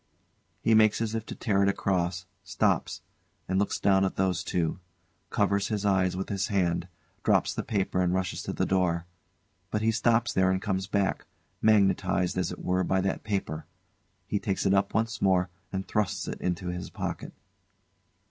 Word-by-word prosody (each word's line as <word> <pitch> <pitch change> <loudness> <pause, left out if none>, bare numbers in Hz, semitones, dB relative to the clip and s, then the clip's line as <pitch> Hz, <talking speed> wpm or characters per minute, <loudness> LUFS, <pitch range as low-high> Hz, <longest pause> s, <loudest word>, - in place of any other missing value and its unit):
[He 115 - +4
makes 110 -1 +5
as 115 -1 -1
if 110 -1 -3
to - - -6
tear 100 -3 +1
it 100 - +4
across, 90 -2 -1 0.2
stops, 90 - 0 0.4
and 95 +1 +1
looks 100 - 0
down 95 -1 +4
at 95 - 0
those 95 -1 0
two; 85 -1 -1 0.5
covers 100 0 +1
his 105 -2 -2
eyes 95 -2 +2
with 95 - -4
his 100 -1 -1
hand; 90 -4 0 0.4
drops - - +3
the - - -2
paper 95 -3 -1
and 90 -1 +2
rushes 95 -1 -1
to - - -4
the - - 0
door. 85 -3 +1 0.6
But 105 0 -1
he 115 - +3
stops 115 +1 +2
there 95 0 +3
and 95 0 +1
comes 95 -1 -2
back, 100 -1 0 0.3
magnetised, 95 -4 +3
as 90 0 -1
it - - -8
were, 90 +1 +2
by 95 +1 +1
that 95 0 -2
paper. 95 -7 -3 0.6
He 105 - -1
takes 100 -3 -2
it 95 - +4
up 100 0 +2
once 115 +2 0
more 95 -2 +2 0.2
and 95 0 -3
thrusts 105 -5 -1
it - - -5
into 90 0 -2
his 90 0 -5
pocket. - - -5
95 Hz, 180 wpm, -28 LUFS, 90-105 Hz, 0.6 s, makes